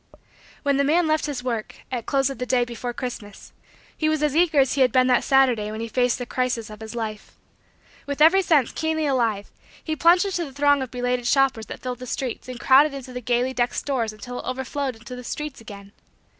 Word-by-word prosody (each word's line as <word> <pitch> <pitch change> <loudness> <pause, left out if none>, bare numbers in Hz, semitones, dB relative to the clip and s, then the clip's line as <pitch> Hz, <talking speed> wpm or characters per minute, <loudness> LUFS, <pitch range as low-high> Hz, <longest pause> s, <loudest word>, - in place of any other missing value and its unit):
When 280 -2 +2
the 280 - +3
man 325 +5 +3
left 310 0 +1
his 270 -4 -4
work, 230 -4 -3 0.2
at 240 -3 -4
close 275 -1 +1
of 270 - -8
the 250 - -2
day 245 -1 +2
before 240 0 -5
Christmas, 235 -5 -7 0.4
he 310 - 0
was 310 -1 0
as 300 -1 +1
eager 325 -3 +3
as 265 -1 +3
he 275 - 0
had 255 - +4
been 255 -1 +4
that 250 -1 +3
Saturday 250 -6 +3
when 215 +1 -6
he 230 - -3
faced 245 +2 +1
the 245 - -5
crisis 245 -3 -2
of 210 - -10
his 220 +1 -8
life. 215 -2 -5 0.7
With 285 0 -4
every 330 +6 +6
sense 300 -9 +2
keenly 315 -1 -1
alive, 230 -7 0 0.3
he 315 - -2
plunged 345 +4 +4
into 370 -3 -1
the 275 - -11
throng 285 0 +3
of 260 - -4
belated 245 0 -2
shoppers 270 -4 +2
that - - -8
filled 250 -1 -5
the 255 - -8
streets 255 0 -4
and 250 -1 -7
crowded 275 +3 +5
into 260 -2 -8
the 250 - -5
gaily 245 +2 0
decked 245 -1 0
stores 245 -6 -1
until 215 +4 -8
it - - -8
overflowed 265 +1 -3
into 235 +3 -10
the 250 - -9
streets 300 +1 -5
again. 200 -2 -11
255 Hz, 225 wpm, -23 LUFS, 240-285 Hz, 0.7 s, every